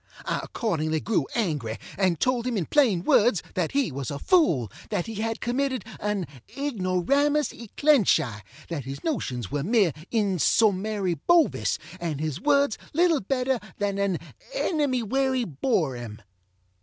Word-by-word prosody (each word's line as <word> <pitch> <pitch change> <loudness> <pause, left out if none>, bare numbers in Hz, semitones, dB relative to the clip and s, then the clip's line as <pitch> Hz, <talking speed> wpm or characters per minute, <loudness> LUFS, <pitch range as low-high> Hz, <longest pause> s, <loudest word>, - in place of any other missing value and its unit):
I - - -1
accordingly 160 -8 -1
grew 190 -6 0
angry, 150 - -1 0.2
and 185 -5 +1
told 255 -1 +1
him 240 -3 -1
in 175 - -1
plain 225 - +3
words, 210 -1 +4
that 180 -3 -1
he 275 - +1
was 135 -2 -4
a 140 - -4
fool, 145 - +2 0.2
that 175 - -1
he 225 - -6
had 225 0 -2
committed 255 -2 -1
an 210 -3 -1 0.3
ignoramus 280 - +1
e 235 - -10
clench 285 - +5
eye, 115 -9 -5 0.3
that 150 -7 -4
his 135 +1 -7
notions 125 - -2
were 145 - -1
mere 195 - +3 0.2
insommary 200 - +2
Bovis, 345 -4 +3 0.2
and 165 -5 -3
his 155 +1 -3
words 280 -4 +2 0.2
little 335 -3 +3
better 255 +4 0 0.2
than 200 -1 -1
an 200 -3 +1 0.4
ennemywerryborŌĆÖem. 245 - 0
205 Hz, 140 wpm, -26 LUFS, 160-260 Hz, 0.4 s, clench